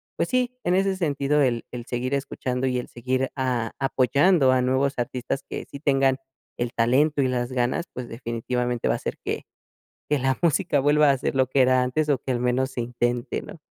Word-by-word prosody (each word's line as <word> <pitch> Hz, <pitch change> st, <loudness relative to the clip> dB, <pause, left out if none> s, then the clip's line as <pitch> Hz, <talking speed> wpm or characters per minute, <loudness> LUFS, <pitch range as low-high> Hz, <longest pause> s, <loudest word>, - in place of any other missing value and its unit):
pues -, -, -1 dB
sí, 250 Hz, 0 st, 0 dB
en 175 Hz, -, +1 dB
ese 195 Hz, 0 st, +2 dB
sentido 150 Hz, -4 st, +1 dB
el 120 Hz, -4 st, +1 dB
el 120 Hz, -1 st, -6 dB
seguir 125 Hz, +2 st, -3 dB
escuchando, 130 Hz, -2 st, -2 dB
y 125 Hz, -1 st, 0 dB
el 125 Hz, -, -6 dB
seguir 130 Hz, +2 st, -2 dB
a 125 Hz, -4 st, -1 dB
apoyando 135 Hz, +3 st, +3 dB
a 130 Hz, 0 st, +3 dB
nuevos 130 Hz, +2 st, +1 dB
artistas 125 Hz, +2 st, -3 dB
que -, -, -5 dB
sí 140 Hz, -, -8 dB
tengan 135 Hz, -2 st, +2 dB, 0.4 s
el 120 Hz, -1 st, -2 dB
talento 140 Hz, +6 st, +2 dB
y 130 Hz, -, +2 dB
las 125 Hz, -1 st, -1 dB
ganas, 130 Hz, +7 st, 0 dB
pues, 125 Hz, -1 st, -6 dB
definitivamente 120 Hz, +1 st, -2 dB
va -, -, +3 dB
a -, -, -2 dB
hacer -, -, -5 dB
que -, -, -2 dB, 0.7 s
que 150 Hz, -1 st, +2 dB
la 130 Hz, 0 st, +1 dB
música 170 Hz, -2 st, +2 dB
vuelva 145 Hz, +1 st, +4 dB
a 135 Hz, -, +1 dB
ser 135 Hz, -, -2 dB
lo 130 Hz, -1 st, +3 dB
que 130 Hz, +1 st, +2 dB
era 130 Hz, 0 st, +4 dB
antes, 140 Hz, +5 st, 0 dB
o 140 Hz, -, +3 dB
que 130 Hz, -, -4 dB
al 120 Hz, -, 0 dB
menos 125 Hz, +2 st, 0 dB
se 125 Hz, -, -3 dB
intente, 120 Hz, 0 st, -2 dB
¿no? -, -, -11 dB
130 Hz, 210 wpm, -24 LUFS, 125-140 Hz, 0.7 s, vuelva